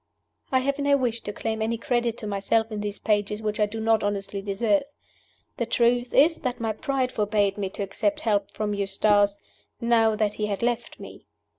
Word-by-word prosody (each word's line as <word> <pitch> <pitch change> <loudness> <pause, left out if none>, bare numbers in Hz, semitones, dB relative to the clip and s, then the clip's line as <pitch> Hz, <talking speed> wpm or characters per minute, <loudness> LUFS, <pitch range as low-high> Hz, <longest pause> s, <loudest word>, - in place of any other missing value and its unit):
I 260 -1 +3
have 280 +2 -1
no 285 0 +3
wish 235 -3 -1
to 205 - -5
claim 220 +1 -3
any 225 +1 0
credit 240 0 0
to - - -7
myself 210 +2 0
in 210 -1 -3
these 205 0 -4
pages 210 -1 0
which 215 -1 -3
I 210 - +3
do 220 +2 -6
not 225 -1 +2
honestly 200 -1 -2
deserve. 200 +1 +1 0.8
The 235 - -1
truth 240 +1 +2
is 325 +4 +5
that 255 -3 -3
my 225 -2 -1
pride 260 +3 -1
forbade 205 -2 +1
me 200 -2 -3
to 200 - -5
accept 300 +10 -1
help 210 -5 +1
from 210 -1 -3
Eustace, 205 0 +2 0.4
now 225 -2 +3
that 210 -1 0
he 210 0 -2
had 200 +1 -3
left 240 -1 -2
me. - - -11
220 Hz, 195 wpm, -25 LUFS, 205-235 Hz, 0.8 s, is